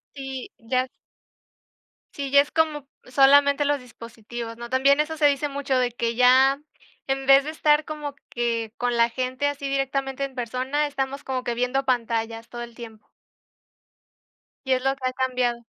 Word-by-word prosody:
Sí, 270 -2 -6
ya 255 +3 -1 1.2
Sí, 275 -2 -5
ya 280 - +7
es 290 - -6
como 305 -3 0 0.2
solamente 280 +2 +4
los 290 0 +1
dispositivos, 230 -1 -9
¿no? 235 0 -8
También 275 +3 +3
eso 305 +1 0
se 300 -2 +4
dice 285 +1 +1
mucho 280 -2 -1
de 250 -1 +1
que 235 0 -2
ya 260 +3 +5 0.5
en 270 0 -1
vez 275 0 +7
de 305 - -4
estar 300 -1 +2
como 300 -2 -6
que 230 -2 -2
con 245 -1 -1
la 235 0 +4
gente 255 +3 -2
así 280 -1 -3
directamente 270 0 -2
en 270 -1 -5
persona, 255 +5 -1
estamos 275 0 -4
como 255 -1 -3
que 240 - -2
viendo 250 +3 -1
pantallas, 230 -2 -1
todo 240 0 -6
el 235 -1 -11
tiempo. 220 -2 -12 1.6
Y 265 - +2
es 255 0 0
lo 270 0 +1
que 260 -1 -3
ha - - -9
cambiado. 250 -2 0
265 Hz, 170 wpm, -24 LUFS, 240-280 Hz, 1.6 s, ya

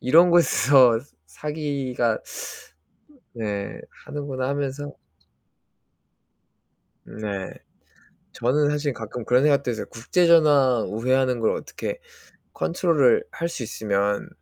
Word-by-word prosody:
이런 165 +7 +5
곳에서 135 -8 +5 0.3
사기가 135 - -2 1.2
네 105 -3 -4 0.3
하는구나 135 -3 -4
하면서. 140 0 -3 2.1
네, 100 -3 -5 0.8
저는 145 +5 +1
사실 145 -1 -1
가끔 115 +1 -7
그런 125 +3 +3
생각도 140 -3 +2
했어요. 110 - -4
국제전화 145 -2 +3
우회하는 125 +2 +1
걸 110 - +2
어떻게 - - -6 0.6
컨트롤을 165 -8 +2
할 170 - -3
수 155 -7 -5
있으면. 100 -2 -1
130 Hz, 215 characters per minute, -23 LUFS, 115-150 Hz, 2.1 s, 이런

